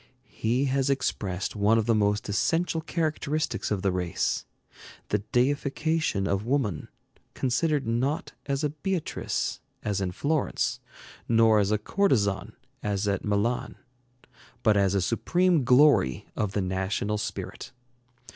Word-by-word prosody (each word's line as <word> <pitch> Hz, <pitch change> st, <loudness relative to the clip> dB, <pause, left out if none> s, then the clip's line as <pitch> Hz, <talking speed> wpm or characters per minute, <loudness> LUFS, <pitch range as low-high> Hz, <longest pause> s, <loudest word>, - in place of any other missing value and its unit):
He 120 Hz, +5 st, 0 dB
has 135 Hz, 0 st, +1 dB
expressed 100 Hz, -8 st, -1 dB
one 105 Hz, +2 st, +3 dB
of 110 Hz, -, +1 dB
the 115 Hz, -, +3 dB
most 105 Hz, -1 st, +1 dB
essential 160 Hz, -, 0 dB
characteristics 155 Hz, -2 st, -1 dB
of 100 Hz, -3 st, -1 dB
the 100 Hz, -, +2 dB
race, 90 Hz, -2 st, -1 dB, 0.6 s
the 105 Hz, -, +1 dB
deification 140 Hz, -2 st, +1 dB
of 100 Hz, 0 st, 0 dB
woman, 115 Hz, -, -1 dB, 0.5 s
considered 145 Hz, +3 st, +1 dB
not 125 Hz, +7 st, -1 dB, 0.2 s
as 140 Hz, +1 st, -1 dB
a 150 Hz, -, +1 dB
Beatrice 175 Hz, +2 st, -2 dB, 0.2 s
as 100 Hz, -2 st, -1 dB
in 90 Hz, -2 st, -1 dB
Florence, 145 Hz, -, -1 dB, 0.5 s
nor 115 Hz, -2 st, +5 dB
as 100 Hz, -1 st, +2 dB
a 105 Hz, -, +2 dB
courtesan 105 Hz, -, +1 dB, 0.3 s
as 105 Hz, -1 st, -1 dB
at 100 Hz, -2 st, 0 dB
Milan, 105 Hz, +4 st, 0 dB, 0.9 s
but 110 Hz, -2 st, +4 dB
as 100 Hz, -1 st, +2 dB
a 100 Hz, -, +2 dB
supreme 175 Hz, -, +2 dB
glory 125 Hz, -, +4 dB
of 100 Hz, -2 st, -1 dB
the 105 Hz, -, 0 dB
national 95 Hz, +3 st, -1 dB
spirit. -, -, -5 dB
115 Hz, 130 wpm, -27 LUFS, 100-145 Hz, 0.9 s, nor